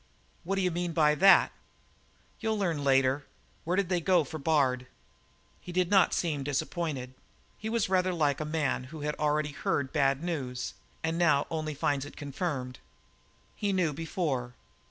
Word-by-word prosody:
"What 195 +3 -1
d'you 185 -2 +1
mean 175 0 -2
by 150 -2 +4
that?" 195 +5 +6 0.9
"You'll 220 -1 -1
learn 170 -8 -1
later. 135 0 +2 0.4
Where 175 +3 +1
did 195 -3 +1
they 180 -2 +1
go 180 -1 +4
for 155 +3 -7
Bard?" 135 -4 +1 0.7
He - - -9
did 180 0 0
not 195 -3 +5
seem 155 -5 -1
disappointed. 140 -2 -2 0.5
He 220 - -4
was 230 -1 +1
rather 185 0 +2
like 150 -5 +1
a 155 +1 -3
man 130 -2 0
who 155 +3 -9
had 150 +1 -1
already 150 0 +1
heard 140 -1 -1
bad 140 -1 +2
news 130 -8 -3 0.3
and 165 +1 -1
now 150 -5 +4
only 155 -2 -3
finds 140 -1 0
it 145 - -12
confirmed. 140 -3 -4 0.8
He 205 -1 -1
knew 180 -5 +1
before. 140 -6 -2
155 Hz, 160 wpm, -29 LUFS, 140-175 Hz, 0.9 s, that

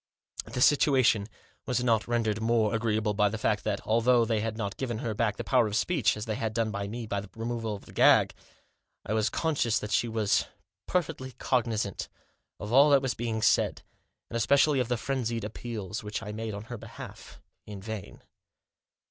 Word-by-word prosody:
The 125 - -4
situation 130 -7 +4 0.4
was 125 0 0
not 115 -5 +2
rendered 110 -3 0
more 115 -1 +2
agreeable 110 -1 0
by 105 0 +3
the 115 - -4
fact 105 -1 0
that, 105 -2 -1
although 115 +2 +3
they 110 -1 0
had 110 0 -3
not 100 -4 -3
given 120 -4 -3
her 115 0 -3
back 105 -1 0
the - - -4
power 125 -4 +3
of 105 - -3
speech, 140 -1 +2
as 105 - -5
they 110 - -2
had 110 0 -3
done 115 -2 0 0.2
me, 115 +2 -5
by 100 -2 -2
the 105 - -12
removal 115 -1 -3
of 100 - -12
the - - -14
gag, - - +5 0.7
I 105 - -2
was 110 0 +2
conscious 145 -9 0
that 105 - -4
she 120 - +2
was 110 -3 +1 0.4
perfectly 150 -7 -2
cognisant 115 -7 -1 0.5
of 105 +3 -5
all 140 +3 +7
that 140 -2 +5
was 130 -1 0
being 110 -1 -3
said, - - +2 0.4
and - - -8
especially 135 +5 +3
of 125 - 0
the 125 0 0
frenzied 120 -2 -2
appeals 105 -2 -5
which 105 +2 -4
I 105 - -5
made 110 0 -4
on 100 - -6
her 120 0 -8
behalf— - - -11 0.3
in 105 -2 -7
vain. 110 0 -7
115 Hz, 190 wpm, -28 LUFS, 105-120 Hz, 0.7 s, all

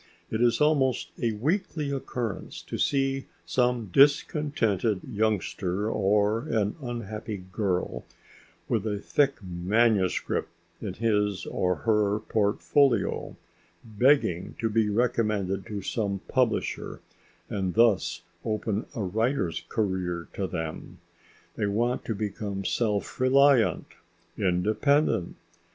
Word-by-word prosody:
It 110 - -1
is 120 -1 +3
almost 130 - +2
a 115 -2 +1
weekly 150 - -1
occurrence 125 -5 -4
to - - -6
see 135 -1 +1 0.2
some 120 -5 0
discontented 135 - +3
youngster 105 -1 -1
or 105 +2 +2
an 105 -2 0
unhappy 110 -5 -5
girl 95 -3 -1 0.6
with 110 -1 0
a 105 -1 -1
thick 140 +7 +1
manuscript 95 +2 +1 0.3
in 100 -4 -4
his 105 -4 0
or 90 0 0
her 105 -2 +3
portfolio, 110 +5 +1 0.5
begging 110 - +2
to 115 -1 -1
be 110 -1 +2
recommended 105 -4 0
to 100 -3 -5
some 100 -3 -2
publisher 130 -3 0 0.5
and 95 -3 -2
thus 115 -4 +3 0.2
open 110 0 -2
a 110 - -2
writer's 100 - 0
career 90 -5 -1
to 95 - -2
them. 80 -3 -5 0.6
They 105 - 0
want 120 +5 0
to 115 - -2
become 100 -1 -4
self 105 0 -1
reliant, 130 -1 +4 0.5
independent. 105 - +1
110 Hz, 105 wpm, -27 LUFS, 100-120 Hz, 0.6 s, reliant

